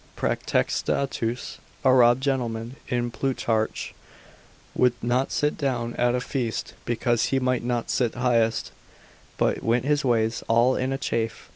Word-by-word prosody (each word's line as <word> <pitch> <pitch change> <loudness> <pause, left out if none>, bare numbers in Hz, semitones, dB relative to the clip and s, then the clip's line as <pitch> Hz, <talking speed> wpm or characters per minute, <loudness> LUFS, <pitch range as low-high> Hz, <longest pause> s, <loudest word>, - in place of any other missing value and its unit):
Praetextatus, 125 -3 -1 0.3
a 130 - +6
robed 120 0 +5
gentleman 120 -3 -2
in 120 -2 -1
Plutarch, 115 -4 -1 0.8
would 125 -1 +3
not 125 +3 0
sit 150 +1 0
down 120 -5 -1
at 120 0 +2
a - - +1
feast, 125 -3 -3
because 120 -1 +1
he 135 - +1
might 125 -2 0
not 120 -1 -1
sit 120 -3 0
highest, 115 -2 +1 0.7
but - - +1
went 120 +2 +1
his 150 0 +2
ways 115 -3 +1
all 120 +3 +4
in 130 +1 -1
a 135 - -1
chafe. 115 -4 -3
120 Hz, 140 wpm, -25 LUFS, 115-130 Hz, 0.8 s, a